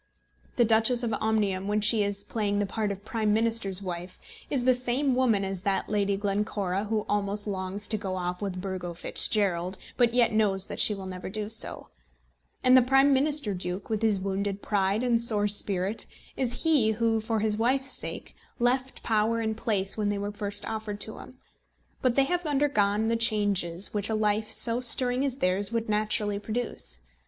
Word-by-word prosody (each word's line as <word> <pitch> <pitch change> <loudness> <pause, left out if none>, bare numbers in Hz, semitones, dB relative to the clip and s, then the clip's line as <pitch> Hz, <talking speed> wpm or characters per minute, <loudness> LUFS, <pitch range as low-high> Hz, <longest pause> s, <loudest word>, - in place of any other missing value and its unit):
The 240 - +4
Duchess 225 +2 +3
of 230 -2 -1
Omnium, 205 -3 0
when 210 +1 +1
she 215 +1 +4
is 200 0 0
playing 205 -1 -1
the 205 - +1
part 210 +1 -2
of 200 +1 -8
Prime 215 -3 0
Minister's 220 -4 0
wife, 180 0 -6 0.3
is 265 -4 -1
the 255 +1 +5
same 250 +2 0
woman 235 -6 +2
as 190 -1 -4
that 195 -1 -1
Lady 200 -2 +1
Glencora 200 -1 -1
who 215 0 -1
almost 205 0 -1
longs 195 0 -2
to 215 - 0
go 190 -2 -3
off 180 0 -3
with 190 -3 -3
Burgo 180 -2 -5
Fitzgerald, 185 -1 0 0.2
but 240 -2 +4
yet 240 -3 +3
knows 200 -3 +2
that - - -7
she 210 - +3
will 195 -1 -8
never 185 -1 -6
do 210 +1 -4
so; 220 - -4 0.7
and 255 0 +6
the 255 - +8
Prime 270 +3 +4
Minister 285 -5 +2
Duke, 180 +3 -5
with 215 -1 -1
his 215 -3 +3
wounded 195 +1 -3
pride 200 +2 0
and 235 -2 +2
sore 210 -3 +2
spirit, 200 0 -1 0.3
is 245 -2 -2
he 285 -10 +3
who, 225 0 +1
for 220 0 -1
his 210 0 0
wife's 265 +4 +1
sake, - - -3 0.2
left 255 +2 0
power 225 +1 +1
and 220 -1 -1
place 205 -3 -1
when 210 -1 0
they 205 - -1
were 205 +1 -3
first 205 0 +2
offered 215 -2 -4
to 220 - -4
him; 255 - -12 0.6
but 255 -2 +2
they 275 - +5
have 355 +5 -1
undergone 225 -8 +1
the 230 - +1
changes 205 -6 +1
which 205 0 0
a 220 - 0
life 215 0 0
so 230 +2 0
stirring 250 +1 +3
as 270 -2 -1
theirs 195 0 0
would 230 -1 -2
naturally 210 -1 0
produce. 215 - -4
210 Hz, 190 wpm, -27 LUFS, 200-230 Hz, 0.7 s, the